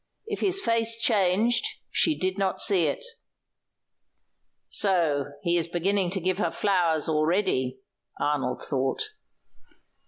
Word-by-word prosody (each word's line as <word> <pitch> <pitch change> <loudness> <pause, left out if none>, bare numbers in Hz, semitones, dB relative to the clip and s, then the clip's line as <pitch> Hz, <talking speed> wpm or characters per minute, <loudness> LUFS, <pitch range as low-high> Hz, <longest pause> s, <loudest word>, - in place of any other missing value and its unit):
If 430 -2 -4
his 385 0 0
face 230 - +1
changed, 215 +1 +2 0.3
she 315 -2 +2
did 185 0 -1
not 190 -1 0
see 185 -5 +3
it. - - -3 1.6
"So 165 -8 +2 0.2
he 170 0 +2
is 170 -1 0
beginning 185 +2 0
to 190 +2 -2
give 185 +1 -1
her - - +1
flowers 175 -6 +1
already," 155 -5 0 0.4
Arnold 135 -4 -1
thought. 135 - -2
185 Hz, 120 wpm, -26 LUFS, 160-210 Hz, 1.6 s, see